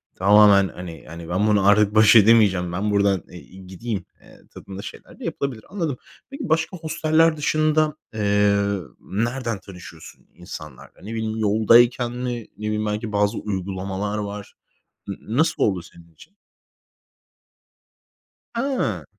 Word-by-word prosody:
tamamen, 100 0 +6
hani 85 -2 -10
hani, 85 +1 -9
ben 100 +4 +1
bunu 100 -2 +3
artık 105 +1 +4
baş 110 +1 +6
edemeyeceğim, 100 -5 +5
ben 100 +4 -2
buradan, 100 -3 +2
eee, 90 - -11 0.2
gideyim, 95 +1 -6 0.2
eee, - - -19
tadında 100 0 -9
şeyler - - -11
de - - -8
yapılabilir. 130 -6 -4
Anladım. 165 -10 -3 0.3
Peki 275 -3 -7
başka 160 +3 0
hosteller 160 0 +1
dışında, 155 0 +1 0.2
eee, 100 -1 +1 0.2
nereden 115 +1 -3
tanışıyorsun 90 -4 -13
insanlarla? 75 -5 -11
Ne 110 +3 -7
bileyim, 110 0 -3
yoldayken 115 +3 +4
mi? 120 -2 -5
Ne 105 - -7
bileyim, 105 0 -1
belki 105 +1 -3
bazı 105 +1 +1
uygulamalar 100 +1 -4
var. 105 -1 -6 0.5
N 100 - -4 0.2
nasıl 160 - +2
oldu 95 -4 +1
senin 85 -1 -18
için? 195 - -19 2.2
A. 265 +2 -2
105 Hz, 130 wpm, -22 LUFS, 95-120 Hz, 2.2 s, tamamen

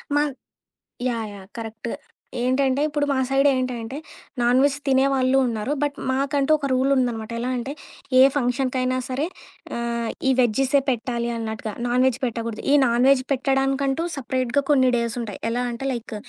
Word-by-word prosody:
Mann 290 0 +2 0.8
yeah! 230 -3 -2
Yeah! 195 -1 -11
Correct. 225 0 -6 0.5
ఏంటంటే, 260 +2 +1
ఇప్పుడు 295 -1 -1
మా - - 0
సైడ్ 270 +1 +3
ఏంటంటే, 255 -1 -3 0.5
నాన్‌వెజ్ 260 +4 +3
తినే 265 0 +4
వాళ్ళు 260 0 +3
ఉన్నారు, 230 +2 -2
బట్ 290 -1 0
మాకంటూ 275 +2 0
ఒక 285 - -3
రూల్ 260 +2 +2
ఉందనమాట. 235 -4 -1
ఎలా 250 +2 -2
అంటే, 255 +3 -4 0.5
ఏ - - +9 0.2
ఫంక్షన్‌కైనా 255 0 0
సరే 265 +4 -1 0.5
ఆహ్, 235 -1 -2 0.2
ఈ - - +5
వెజ్జీసే 265 +4 +3
పెట్టాలి 235 -1 -2
అన్నట్టుగా, 220 -1 -4
నాన్‌వెజ్ 250 +1 +2
పెట్టకూడదు. 230 -2 -3
ఈ - - +6
నాన్ 240 +2 +3
వెజ్ 275 -2 +4
పెట్టడానికంటూ 270 +2 +1
సపరేట్‌గా 255 +1 0
కొన్ని 260 -3 +5
డేస్ 235 0 -2
ఉంటాయి. 210 -4 -7
ఎలా 245 +2 -1
అంటే 235 +3 -5
లైక్ 235 -2 -6
255 Hz, 150 wpm, -23 LUFS, 235-270 Hz, 0.8 s, ఏ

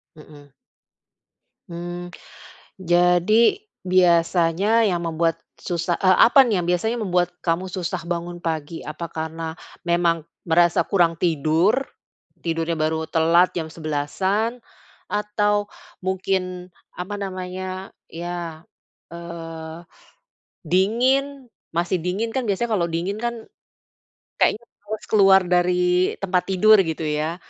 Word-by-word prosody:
Mhm. 145 -2 -15 1.2
Mmm. 175 +1 -6 0.7
Jadi, 180 - +3 0.2
biasanya 180 +4 +3
yang 180 -4 +1
membuat 165 0 -1 0.2
susah 170 -1 -2
eee, 185 -1 +4
apa 270 +3 +6
nih 215 -7 +1
yang 170 - -4
biasanya 220 +7 0
membuat 180 -4 0
kamu 170 +2 0
susah 180 -3 -3
bangun 175 0 -4
pagi? 160 0 -4
Apa 165 +3 -6
karena 160 +1 -5 0.3
memang 170 -2 +1 0.2
merasa 170 +1 +3
kurang 170 -4 +2
tidur? 165 +3 +2 0.7
Tidurnya 165 0 -1
baru 160 +1 -1
telat 170 +2 +4
jam 160 - -2
11:00-an, 190 +10 -2 0.5
atau 210 0 0 0.4
mungkin, 185 -1 -2 0.3
apa 185 +3 -5
namanya, 185 0 -5 0.2
iya, 170 -1 -6 0.5
eee, 165 -1 -8 0.9
dingin? 255 - +1 0.3
Masih 175 +2 +1
dingin, 200 +6 -1
kan 260 - -1
biasanya 215 +4 0
kalau 170 -3 +1
dingin 180 +6 -2
kan 235 0 -2 1.0
kayaknya 220 - +2 0.2
males 210 0 -5
keluar 195 -2 +6
dari 180 0 +2
tempat 180 -2 +1
tidur, 215 +3 +6
gitu 160 0 -3
ya. 155 +2 -1
175 Hz, 110 wpm, -22 LUFS, 165-195 Hz, 1.2 s, apa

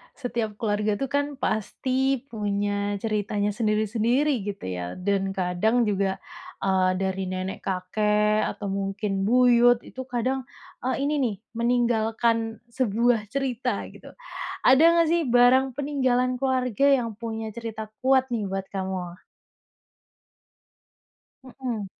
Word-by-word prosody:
Setiap 235 -5 -3
keluarga 210 -1 0
itu 270 +5 -3
kan 285 0 0
pasti 260 +2 -1
punya 205 -1 -1
ceritanya 210 -1 0
sendiri-sendiri, 220 +4 +1
gitu 200 -1 -5
ya. 90 -1 -4
Dan 195 +1 -1
kadang 190 +6 +1
juga, 195 -3 0 0.4
eee, 185 -1 +2
dari 190 0 -2
nenek 185 +1 -4
kakek 210 +3 +1
atau 200 -2 -4
mungkin 195 0 -2
buyut, 245 0 +5
itu 260 0 -8
kadang, 255 +1 -2 0.4
eee, 265 +1 0
ini 290 +2 +1
nih, 235 -7 0 0.2
meninggalkan 230 -1 +1
sebuah 235 -2 +1
cerita 250 -2 -2
gitu. - - -14 0.5
Ada 320 +6 +6
nggak 335 -1 +4
sih 340 - +3
barang 250 +2 +4
peninggalan 255 -3 0
keluarga 260 0 +2
yang 245 -5 +2
punya 220 0 -5
cerita 220 -1 -6 0.2
kuat 265 0 +4
nih 210 -4 -2
buat 195 0 -3
kamu? 185 -2 -4 2.2
Mhm. 250 -5 -5
225 Hz, 115 wpm, -25 LUFS, 200-255 Hz, 2.2 s, Ada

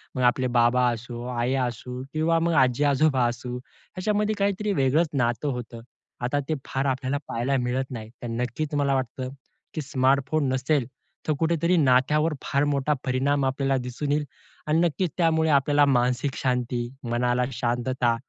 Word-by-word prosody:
मग 130 - -1
आपले 125 +1 +3
बाबा 120 +1 +4
असो, 120 +1 -6
आई 120 +2 0
असू 125 0 -3
किंवा 165 +1 +2
मग 170 0 +1
आजी-आजोबा 135 0 +3
असू 125 +1 -4
याच्यामध्ये 210 +10 -3
काहीतरी 200 +1 0
वेगळंच 150 +3 +2
नातं 120 +1 0
होतं. 120 -2 -6 0.4
आता 145 +4 0
ते 155 - +1
फार 135 +1 -2
आपल्याला 130 +1 -1
पाहायला 130 +4 0
मिळत 130 +2 -2
नाही. 110 -3 -6
तर 120 - -5
नक्कीच 125 +6 -3
मला 140 -1 +2
वाटतं, 130 0 -3 0.4
की 155 - -3
स्मार्टफोन 140 +1 +1
नसेल, 130 0 +1 0.4
तर 155 - +3
कुठेतरी 170 +2 +2
नात्यावर 150 +3 +3
फार 140 +1 +1
मोठा 145 0 +1
परिणाम 135 +2 +1
आपल्याला 135 0 +1
दिसून 125 +3 -3
येईल. 150 0 +1 0.4
आणि 155 +2 +3
नक्कीच 175 0 +1
त्यामुळे 160 -2 +2
आपल्याला 145 +1 +4
मानसिक 125 +1 +1
शांती, 125 -2 -1 0.2
मनाला 125 +1 +1
शांतता, 120 0 0
130 Hz, 150 wpm, -25 LUFS, 125-150 Hz, 0.4 s, बाबा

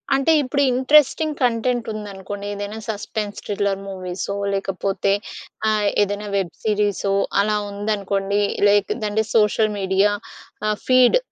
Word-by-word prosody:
అంటే, 275 +4 +2
ఇప్పుడు 280 +2 0
interesting 300 +3 +3
content 240 0 +1
ఉందనుకోండి. 200 -1 -7
ఏదైనా 205 +2 -5
సస్పెన్స్ 210 0 -4
థ్రిల్లర్ 200 -1 -1
మూవీసో, 185 +1 -4 0.2
లేకపోతే 195 0 -1 0.6
ఆహ్, 210 -1 +1 0.2
ఏదైనా 205 +1 -3
వెబ్ 175 -4 -2
సిరీసో 205 -2 0 0.3
అలా 210 +1 +1
ఉందనుకోండి. 200 -1 -1 0.3
లైక్‌దంటే 205 +2 +2
అంటే 220 +1 +1
సోషల్ 215 0 +3
మీడియా 190 +2 +2 0.6
ఆహ్, 210 -1 0
ఫీడ్, 255 - +5
205 Hz, 115 wpm, -21 LUFS, 200-220 Hz, 0.6 s, ఫీడ్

